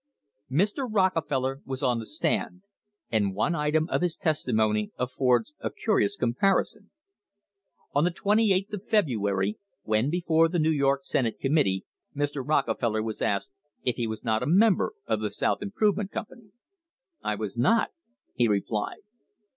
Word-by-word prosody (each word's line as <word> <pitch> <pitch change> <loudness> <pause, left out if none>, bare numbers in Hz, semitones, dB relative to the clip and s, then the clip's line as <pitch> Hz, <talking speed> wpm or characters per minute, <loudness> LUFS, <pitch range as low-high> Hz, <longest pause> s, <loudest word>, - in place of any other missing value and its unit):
Mr. 205 - +1
Rockefeller 150 -9 +1
was 130 -1 -5
on 120 -2 +2
the 110 - -7
stand, 180 +4 -1 0.5
and 100 -4 +1
one 110 - +1
item 155 0 +1
of - - 0
his 175 -2 0
testi 155 -7 -1
mony 105 -1 +2
affords 125 +1 +1
a - - -2
curious 205 -2 +1
comparison. 195 - 0 1.0
On 145 - +3
the 175 - +3
28th 200 +2 +1
of 205 -2 -4
February, 105 - +1 0.2
when 110 +5 +1
before 165 -1 +2
the 175 - -1
New 160 0 +3
York 140 -2 +1
Senate 120 -4 -1
committee, 135 -10 +1 0.3
Mr. 145 -1 -1
Rocke 135 -5 +1
feller 110 -2 0
was 110 -1 -5
asked 100 -1 0 0.3
if 125 - 0
he 120 -2 -1
was 110 0 -5
not 110 -2 +1
a 125 - -2
member 195 - +4
of - - 0
the - - -2
South - - 0
Improve 205 0 +1
ment 205 -2 -3
Company. 225 0 -8 0.7
"I 105 - -1
was 105 -1 -4
not," 180 - +3 0.4
he 120 -2 +2
replied. 105 0 -1
140 Hz, 155 wpm, -27 LUFS, 115-185 Hz, 1.0 s, member